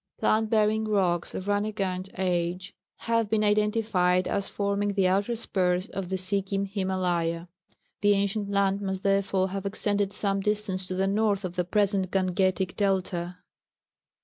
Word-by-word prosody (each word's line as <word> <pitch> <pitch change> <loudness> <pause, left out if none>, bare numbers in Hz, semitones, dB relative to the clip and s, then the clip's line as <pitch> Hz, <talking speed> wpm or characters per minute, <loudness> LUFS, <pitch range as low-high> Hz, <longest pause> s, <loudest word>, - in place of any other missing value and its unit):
Plant 220 0 +1
bearing 220 0 +2
rocks 185 -5 0
of 185 - -4
Rániganj 205 -2 -1
age 180 +1 -1 0.3
have 230 -2 0
been 215 0 +2
identified 210 -4 +2
as 200 - -2
forming 200 0 -1
the 195 -2 +3
outer 200 +5 +1
spurs 185 -3 0
of 195 -5 -5
the 190 - -1
Sikkim 195 +1 0
Himálaya; 180 -4 -1 0.5
the 205 0 +5
ancient 200 +1 -1
land 200 0 +1
must 190 -1 -3
therefore 195 -1 +1
have 195 0 -4
extended 205 0 0
some 200 -1 +1
distance 195 -2 -1
to 185 - -4
the 190 +1 +1
north 200 0 +1
of 180 -1 -5
the 180 - +1
present 195 -1 +1
Gangetic 185 0 0
delta. 185 -3 -1
195 Hz, 150 wpm, -27 LUFS, 185-205 Hz, 0.5 s, the